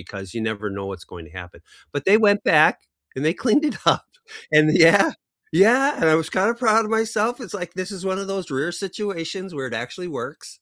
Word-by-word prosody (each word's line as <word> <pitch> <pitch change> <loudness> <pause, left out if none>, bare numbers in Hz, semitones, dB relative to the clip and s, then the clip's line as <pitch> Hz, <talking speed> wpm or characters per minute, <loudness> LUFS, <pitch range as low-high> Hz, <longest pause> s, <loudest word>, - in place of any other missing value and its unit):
because 95 +2 -9
you 115 - -4
never 105 -1 -6
know 100 - -5
what's 90 -3 -9
going 85 -2 -10
to 90 - -11
happen. 90 - -16 0.3
But 145 - -2
they 210 +3 +6
went 205 0 +2
back, - - +6 0.4
and 130 - -3
they 160 +3 +2
cleaned 265 +6 +3
it - - -8 0.2
up, - - -10 0.5
and 155 - +7
th - - +2
yeah 195 +3 +5 0.6
yeah, 250 +5 +4
and 160 - +3
I - - +6
was 160 - -9
kinda 195 +5 +3
proud 225 0 +4
of 215 - -6
myself, 225 +1 0
it's, 205 -5 -9
like, 175 -1 -6
this 185 +2 -5
is 185 - -10
one 190 - -2
of 195 - -7
those 190 -4 -5
rare 155 +6 -2
situations 190 -1 -5
where 135 -2 -5
it - - -3
actually 180 +8 -8
works. - - -10
185 Hz, 230 wpm, -22 LUFS, 135-210 Hz, 0.6 s, and